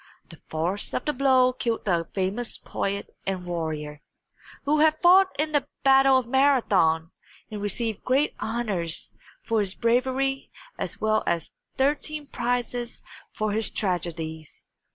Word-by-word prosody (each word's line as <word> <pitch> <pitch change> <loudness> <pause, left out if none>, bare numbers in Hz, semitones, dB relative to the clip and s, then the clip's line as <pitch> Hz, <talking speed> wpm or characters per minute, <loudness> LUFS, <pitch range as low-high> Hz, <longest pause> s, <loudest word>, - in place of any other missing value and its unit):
The - - -14
force 170 +6 -1
of - - -2
the 300 - 0
blow 255 -2 +4
killed 230 -3 -2
the 170 -4 +1
famous 200 +5 -1
poet 200 0 -4
and 185 -2 -2
warrior, 155 -4 -4 0.6
who 300 +2 +2
had 310 0 +4
fought 370 +2 +6
in 305 +1 +1
the 290 -3 +1 0.2
Battle 270 0 +6
of 260 - 0
Marathon 225 - +3 0.4
and 210 -1 -5
received 220 +1 -2
great 270 +4 +2
honors 210 -7 -2 0.3
for 225 -1 0
his 200 -2 -1
bravery 260 +3 0 0.3
as - - -5
well 215 0 +2
as 170 -2 -1 0.3
thirteen 295 +2 0
prizes 245 -2 -3 0.3
for 215 -1 -1
his 220 +1 0
tragedies. 165 -5 -4
225 Hz, 135 wpm, -25 LUFS, 180-270 Hz, 0.6 s, fought